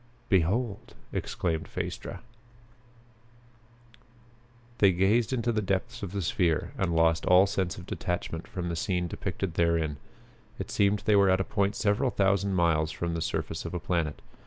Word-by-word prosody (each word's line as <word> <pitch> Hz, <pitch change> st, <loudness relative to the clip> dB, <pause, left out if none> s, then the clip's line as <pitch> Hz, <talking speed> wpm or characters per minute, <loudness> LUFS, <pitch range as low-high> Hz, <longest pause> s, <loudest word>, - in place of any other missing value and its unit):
"Behold!" 100 Hz, +4 st, 0 dB, 0.2 s
exclaimed 80 Hz, -3 st, -2 dB
Phaestra. -, -, -5 dB, 2.6 s
They 100 Hz, -2 st, +6 dB
gazed 100 Hz, +6 st, +2 dB
into 120 Hz, -2 st, 0 dB
the 110 Hz, -2 st, 0 dB
depths 95 Hz, -1 st, -2 dB
of 100 Hz, -4 st, -5 dB
the 100 Hz, -1 st, -2 dB
sphere 85 Hz, -1 st, +1 dB
and 85 Hz, -3 st, -1 dB
lost 80 Hz, 0 st, +3 dB
all 90 Hz, +2 st, +7 dB
sense 95 Hz, -3 st, -2 dB
of -, -, -9 dB
detachment 85 Hz, -2 st, -4 dB
from 90 Hz, -2 st, -4 dB
the 85 Hz, -, -2 dB
scene 90 Hz, +1 st, -1 dB
depicted 90 Hz, +1 st, -4 dB
therein. 85 Hz, -3 st, +1 dB, 0.6 s
It -, -, -5 dB
seemed 100 Hz, 0 st, +2 dB
they 105 Hz, -, +4 dB
were 100 Hz, -1 st, +5 dB
at 95 Hz, 0 st, +3 dB
a -, -, +2 dB
point 100 Hz, 0 st, 0 dB
several 110 Hz, +6 st, +1 dB
thousand 100 Hz, -2 st, +1 dB
miles 80 Hz, -3 st, +2 dB
from 85 Hz, -1 st, -3 dB
the 85 Hz, -, -2 dB
surface -, -, -2 dB
of -, -, -5 dB
a -, -, -1 dB
planet. 85 Hz, -4 st, -2 dB
95 Hz, 160 wpm, -28 LUFS, 85-100 Hz, 2.6 s, all